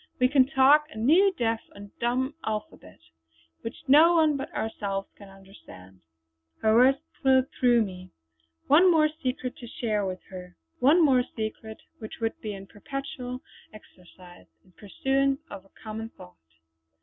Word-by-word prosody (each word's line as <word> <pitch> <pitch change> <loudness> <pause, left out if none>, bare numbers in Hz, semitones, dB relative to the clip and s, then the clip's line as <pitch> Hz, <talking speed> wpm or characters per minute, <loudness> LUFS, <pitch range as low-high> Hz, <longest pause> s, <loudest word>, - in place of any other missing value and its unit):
We 250 - +3
can 265 -2 +4
talk 275 +3 +4
a 220 - -12
new 330 - +4
deaf 225 -2 0 0.2
and 200 0 -12
dumb 255 +4 -1
alphabet; 210 - -6 0.6
which 230 - -8
no 315 +6 +6
one 310 -3 +3
but 270 - -6
ourselves 200 -3 -4
can 200 -1 -14
understand!" 190 - -16 0.6
Her 220 0 +4
words 255 +4 +5 0.2
thrilled 265 -2 +3
through 240 -2 +3
me. 185 -2 -9 0.6
One 340 +6 +5
more 310 -3 +4
secret 255 -2 -3
to 240 - -10
share 215 -3 -2
with 185 -1 -5
her; 180 -1 -10 0.2
one 315 +6 +5
more 260 -3 +4
secret 220 0 -6 0.2
which 220 - -9
would 225 -1 -1
be 210 -2 -5
in 195 0 -10
perpetual 255 +3 -7 0.3
exercise, 180 -3 -17 0.2
in 185 - -24
pursuance 270 +8 -1
of 195 -1 -9
a - - -24
common 220 +1 -6
thought. 90 - -15
230 Hz, 150 wpm, -26 LUFS, 200-270 Hz, 0.6 s, no